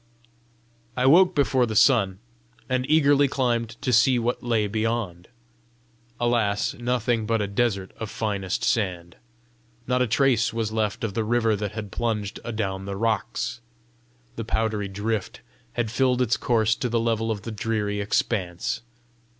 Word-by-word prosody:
I 125 - +2
woke 180 +6 +6
before 135 -4 +2
the 110 - -4
sun, 105 -6 +4 0.5
and 130 +1 -1
eagerly 145 -2 +5
climbed 120 -4 -1
to 125 - +1
see 120 +3 +5
what 120 +1 -1
lay 115 -3 +1
beyond. 110 -4 -2 0.9
Alas, 115 -4 +1
nothing 120 -2 -1
but 115 0 +1
a 105 - 0
desert 100 -2 -1
of 110 - -4
finest 100 -5 -2
sand! 90 -6 -1 0.7
Not 125 0 +1
a 125 - +2
trace 120 -1 +2
was 115 -1 -2
left 110 -1 -1
of 110 -3 -2
the 115 - 0
river 115 -1 +2
that 105 0 -4
had 105 -2 -6
plunged 110 -4 -2
adown 100 -4 -3
the 100 0 -4
rocks! 115 +2 -1 0.8
The 115 - -3
powdery 110 -2 -1
drift 105 +1 -3 0.3
had 120 -3 -2
filled 125 +1 +2
its 120 0 +1
course 110 -2 +2
to 125 - -2
the 115 0 +1
level 115 -1 0
of 105 -2 -3
the 115 - -5
dreary 105 -2 -2
expanse! 95 -3 -1
115 Hz, 150 wpm, -25 LUFS, 105-120 Hz, 0.9 s, woke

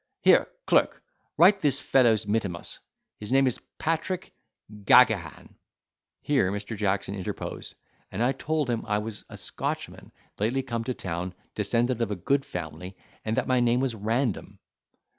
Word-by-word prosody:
Here, - - +5 0.2
clerk, - - +2 0.3
write 195 +4 +6
this 145 -6 +2
fellow's 115 -5 +3
mittimus. 100 -5 -2 0.4
His 105 +2 -6
name 135 +1 +5
is 125 - 0 0.2
Patrick 165 +3 -2 0.4
Gaghagan." 105 - +3 0.7
Here 135 -11 +2
Mr. 105 +2 -4
Jackson 100 -1 -1
interposed, 95 -3 -6 0.4
and 120 +7 0
told 155 -2 0
him 120 -2 -1
I 105 -1 +1
was 105 0 -6
a - - -9
Scotchman - - -4 0.3
lately 120 +6 0
come 115 -3 -3
to 125 - -2
town, 90 +1 -4 0.2
descended 120 +3 0
of 115 - 0
a 105 - -2
good 135 +10 +1
family, 90 - -7 0.3
and 110 +1 -2
that - - +1
my 130 -1 +2
name 120 0 +3
was 130 -2 0
Random. 110 +1 -2
115 Hz, 145 wpm, -27 LUFS, 100-130 Hz, 0.7 s, write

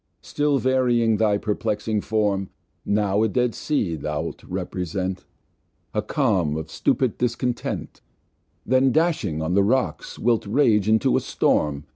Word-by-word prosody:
Still 145 -1 0
varying 125 -4 +2
thy 105 -1 +2
perplexing 105 0 -2
Form, 100 -3 0 0.3
Now 100 0 +1
a 110 - +3
Dead 120 +3 0
Sea 105 - -1
thou'lt 75 0 -4
represent, 90 +1 -4 0.7
A 105 - 0
Calm 100 - 0
of 80 0 -6
stupid 130 -4 0
Discontent, 125 0 -2 0.6
Then, 130 +2 +3
dashing 130 - 0
on 85 +3 -1
the 100 - +4
Rocks 100 - -1
wilt 115 -3 +1
rage 110 -3 +3
into 110 -2 +3
a - - 0
Storm. 75 -1 0
105 Hz, 130 wpm, -23 LUFS, 95-125 Hz, 0.7 s, the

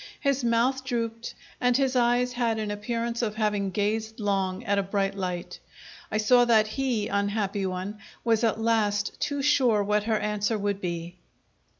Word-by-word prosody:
His 275 -2 0
mouth 240 +3 +2
drooped, 230 -2 -3 0.2
and 245 -1 +3
his 265 -1 +1
eyes 245 0 +2
had 235 -2 0
an 215 -1 -2
appearance 230 +3 -2
of 215 -3 -2
having 210 -2 0
gazed 220 +3 -2
long 195 -3 -1
at 200 0 +1
a - - +3
bright 195 0 -1
light. 180 -3 -4 0.5
I - - +1
saw 245 +3 +5
that 225 -2 +5
he, 240 -4 -1
unhappy 200 -1 -1
one, 185 +3 -5 0.2
was 230 -1 +2
at 225 -1 +1
last 215 -2 0
too 285 -1 -1
sure 255 -7 +3
what 210 +1 +1
her 220 -1 +1
answer 210 +1 -1
would 200 -1 -2
be. 175 0 -4
215 Hz, 170 wpm, -27 LUFS, 205-235 Hz, 0.5 s, saw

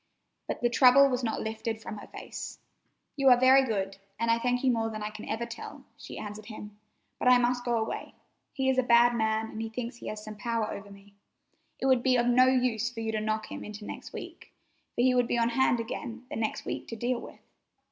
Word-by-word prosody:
But - - -4
the 240 - +3
trouble 265 +2 +7
was 250 -1 -1
not 225 -2 -1
lifted 220 0 -3
from 215 -1 -7
her - - -11
face. - - -8 0.6
"You 275 -2 +4
are 250 -1 +7
very 260 +1 +7
good, 195 -5 -2 0.2
and 230 0 +2
I 230 - +3
thank 245 +1 0
you 260 - +4
more 225 -1 0
than 215 -1 -5
I 210 - -3
can 215 0 -9
ever 225 +2 -2
tell," 235 0 -9
she - - -10
answered 210 0 -7
him; 210 -2 -9 0.4
"but - - 0
I 250 0 +8
must 245 0 +1
go 240 -1 +1
away. 220 0 -4 0.4
He 265 -1 -1
is 260 -1 +3
a - - +6
bad 240 0 +5
man, 220 -1 0
and 220 - -5
he 225 - -3
thinks 235 +1 -5
he - - -9
has 215 0 -5
some 215 -1 -8
power 225 0 -1
over 200 0 -8
me. 200 0 -16 0.7
It - - -2
would 260 -2 +4
be 255 0 +3
of 240 -1 +3
no 250 +1 +5
use 245 -3 +2
for 245 -2 -9
you 220 0 -1
to 215 -1 -1
knock 215 0 -2
him - - -6
into 210 0 -8
next - - -8
week, - - -9 0.4
for - - +1
he 255 +1 +4
would 245 -1 +3
be 240 - 0
on 230 0 +2
hand 245 0 +2
again 230 +1 -5
the - - -3
next 220 -1 -2
week - - -4
to 230 - -6
deal 240 +2 -1
with. - - -11
235 Hz, 240 wpm, -29 LUFS, 220-250 Hz, 0.7 s, I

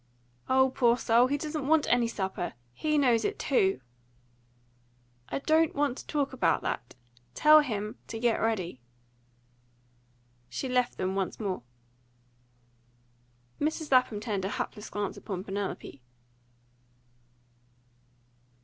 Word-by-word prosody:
"O 265 0 +4
poor 245 -3 +3
soul! 240 +1 +4
He 285 +2 0
doesn't 300 -1 -4
want 315 0 +4
any 240 -1 +3
supper. 190 -5 -3 0.2
HE 305 - 0
knows 245 -5 +3
it - - -1
too." 190 - +1 1.5
"I - - -2
don't 315 +3 +2
want 285 -3 +1
to - - -11
talk 285 -3 -1
about 260 - +1
that. 120 - -4 0.4
Tell 305 0 +7
him 215 -7 -3
to 225 - -5
get 235 0 +1
ready." 185 - -1 1.7
She 265 - -4
left 250 -1 0
them 185 0 -1
once 195 -1 -2
more. 195 - -2 2.0
Mrs. 310 0 -2
Lapham 255 -5 +4
turned 210 -3 -3
a 190 - -1
hapless 210 +1 -5
glance 205 -1 -3
upon 190 -3 -5
Penelope. 195 -8 -5
240 Hz, 120 wpm, -29 LUFS, 200-280 Hz, 2.0 s, Tell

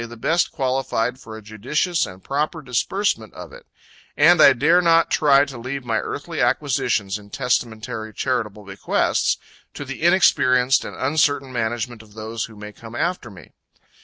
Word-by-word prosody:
_) - - -11
the 120 - -10
best 160 +9 +1
qualified 130 -3 -1
for 110 -3 -10
a 110 - -12
judicious 130 - -1
and 95 0 -12
proper 150 +3 -2
disbursement 125 - -1
of - - -10
it; - - -14 0.5
and 165 +2 +6
I 140 - +8
dare 160 +8 +3
not 165 -1 +3
try 140 -2 +4
to 135 -4 -9
leave 130 +2 -5
my 115 -2 0
earthly - - -5
acquisitions 100 +1 0
in 100 0 -16
testamentary 110 -3 -2
charitable 110 -3 -3
bequests 95 -1 0 0.4
to 145 - -6
the 135 +1 -7
inexperienced 130 -8 +4
and - - -7
uncertain 140 -1 0
management 120 0 -3
of 105 -1 -19
those 110 +1 -4
who 110 - -14
may 105 0 -9
come 115 +2 -12
after 170 -3 -2
me. 95 -3 -14
125 Hz, 165 wpm, -21 LUFS, 110-145 Hz, 0.5 s, I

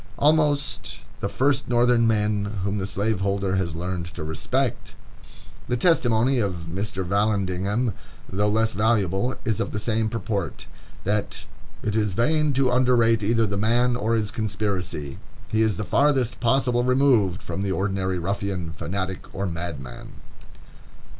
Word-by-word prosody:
Almost 145 -2 +1 0.2
the 100 - -2
first 135 +2 +1
Northern 120 -1 +4
men 105 -2 0
whom 100 +1 -1
the 95 - -2
slaveholder 100 -1 0
has 85 -4 -1
learned 90 0 -3
to - - -5
respect! 90 - -2 0.7
The 125 - 0
testimony 125 -4 +3
of 90 -6 -2
Mr. 95 0 -3
Vallandigham, 100 +3 0 0.3
though 105 +2 0
less 110 +1 +1
valuable, 105 +1 +1
is 110 -3 0
of - - -2
the - - -4
same 110 0 0
purport, 100 - -3 0.4
that 105 +1 -2 0.4
"it 105 -1 -1
is 105 -3 +1
vain 150 - +2
to 130 -1 +2
underrate 120 -3 +3
either 115 +2 +2
the 100 -1 -2
man 120 +4 +2
or 115 -1 0
his 110 -2 -1
conspiracy.... 95 -9 -3 0.3
He 110 - +1
is 110 -4 +2
the - - -2
farthest 130 -6 +2
possible 120 0 +2
removed 125 -8 +3
from 95 - -4
the 100 -1 -1
ordinary 95 -1 -1
ruffian, 95 -1 -3
fanatic, 95 +3 -4
or 100 - -2
madman." 80 -8 -6
105 Hz, 140 wpm, -24 LUFS, 95-120 Hz, 0.7 s, Northern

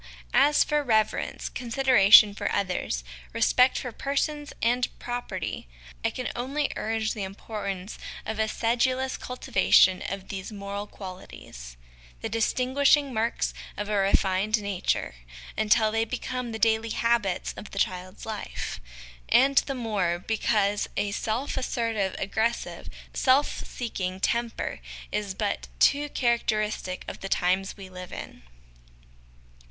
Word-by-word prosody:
As 295 0 +5
for 300 0 +1
reverence, 220 -4 0
consideration 235 -5 +6
for 205 0 -2
others, 180 - -1 0.3
respect 250 +1 +4
for 250 - -4
persons 290 +4 -2
and 245 +2 +2
property, 245 - -4 0.4
I - - +3
can 255 - -4
only 275 +4 -1
urge 220 0 -1
the 215 - -6
importance 195 0 -5 0.3
of 220 0 -4
a 220 - +2
sedulous 255 +4 +1
cultivation 195 -7 +3
of 195 0 -6
these 190 +1 -5
moral 200 0 -5
qualities 180 - -10 0.4
the - - -3
distinguishing 260 +4 +2
marks 225 +1 0 0.2
of 205 0 -3
a 210 - 0
refined 195 +2 +2
nature 200 - -1 0.4
until 220 0 +3
they 225 +1 +1
become 250 +1 -4
the 220 - -4
daily 225 0 +2
habits 225 -5 0
of 210 - -9
the - - -10
child's 185 -1 -2
life; 210 - -5 0.5
and 275 +2 +6
the 275 - -2
more, 205 -8 0
because 205 +1 +1
a 205 0 0
self 225 +6 -2
assertive, 230 -6 -1
aggressive, 220 +4 -2 0.2
self 275 +2 +2
seeking 190 -6 -4
temper 235 +3 -1 0.3
is 205 -2 -2
but - - -2
too 290 - +3
charac 240 -4 +1
teristic 210 -4 -1
of - - -6
the 195 - -6
times 190 +3 +1
we 195 -1 -9
live 180 -1 -9
in. - - -8
220 Hz, 130 wpm, -27 LUFS, 195-245 Hz, 0.5 s, consideration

